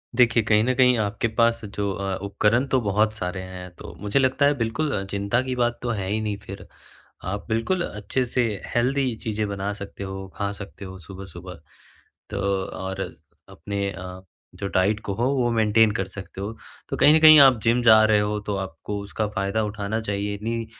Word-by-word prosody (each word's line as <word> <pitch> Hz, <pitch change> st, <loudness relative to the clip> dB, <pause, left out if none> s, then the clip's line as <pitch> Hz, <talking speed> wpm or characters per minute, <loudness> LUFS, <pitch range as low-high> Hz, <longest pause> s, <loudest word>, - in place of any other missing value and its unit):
देखिए, 115 Hz, -2 st, +4 dB
कहीं 110 Hz, -1 st, +3 dB
न 130 Hz, +2 st, +1 dB
कहीं 125 Hz, -1 st, +5 dB
आपके 105 Hz, +1 st, -1 dB
पास 115 Hz, +1 st, +1 dB
जो 100 Hz, 0 st, -3 dB
अ, 95 Hz, -1 st, -3 dB
उपकरण 105 Hz, +5 st, +2 dB
तो 130 Hz, -, +2 dB
बहुत 105 Hz, +1 st, +1 dB
सारे 95 Hz, -3 st, -4 dB
हैं। 90 Hz, 0 st, -8 dB
तो 85 Hz, -, -10 dB
मुझे 105 Hz, +6 st, +1 dB
लगता 130 Hz, +1 st, +2 dB
है 145 Hz, -, +4 dB
बिल्कुल 115 Hz, -2 st, -1 dB
चिंता 100 Hz, +4 st, 0 dB
की 130 Hz, -1 st, -3 dB
बात 120 Hz, -1 st, 0 dB
तो 120 Hz, -, -1 dB
है 100 Hz, -5 st, -2 dB
ही 110 Hz, +2 st, 0 dB
नहीं 105 Hz, -2 st, -2 dB
फिर। 100 Hz, +1 st, -9 dB, 0.6 s
आप 100 Hz, +2 st, -4 dB
बिल्कुल 115 Hz, +12 st, 0 dB
अच्छे 105 Hz, +5 st, -2 dB
से 125 Hz, +1 st, 0 dB, 0.3 s
हेल्दी 130 Hz, +1 st, +1 dB
चीज़ें 110 Hz, -1 st, -2 dB
बना 100 Hz, 0 st, -3 dB
सकते 100 Hz, 0 st, -8 dB
हो, 95 Hz, 0 st, -6 dB
खा 100 Hz, -1 st, -1 dB
सकते 100 Hz, 0 st, -9 dB
हो 95 Hz, 0 st, -9 dB
सुबह-सुबह। 95 Hz, +1 st, -10 dB, 0.7 s
तो -, -, -3 dB, 0.3 s
और 95 Hz, 0 st, -6 dB, 0.5 s
अपने 100 Hz, +5 st, -4 dB
अ, 95 Hz, -1 st, -8 dB, 0.3 s
जो 100 Hz, -, -5 dB
डाइट 100 Hz, +3 st, +2 dB
को 100 Hz, -, -1 dB
हो 115 Hz, +4 st, -1 dB
वो 125 Hz, -3 st, +1 dB
मेंटेन 110 Hz, -1 st, +4 dB
कर 105 Hz, -2 st, -1 dB
सकते 95 Hz, 0 st, -9 dB
हो। 100 Hz, +3 st, -4 dB, 0.4 s
तो -, -, -3 dB
कहीं 150 Hz, -, +6 dB
न 160 Hz, -, +6 dB
कहीं 155 Hz, -1 st, +9 dB
आप 135 Hz, -3 st, +7 dB
जिम 120 Hz, +2 st, +3 dB
जा 110 Hz, -2 st, +7 dB
रहे 110 Hz, -1 st, +4 dB
हो 105 Hz, 0 st, -1 dB
तो 100 Hz, -1 st, -1 dB
आपको 100 Hz, +1 st, -5 dB
उसका 105 Hz, +2 st, -3 dB
फ़ायदा 105 Hz, +1 st, -1 dB
उठाना 105 Hz, +1 st, -3 dB
चाहिए। 100 Hz, -1 st, -2 dB
इतनी 115 Hz, +2 st, -3 dB
105 Hz, 195 wpm, -24 LUFS, 100-115 Hz, 0.7 s, कहीं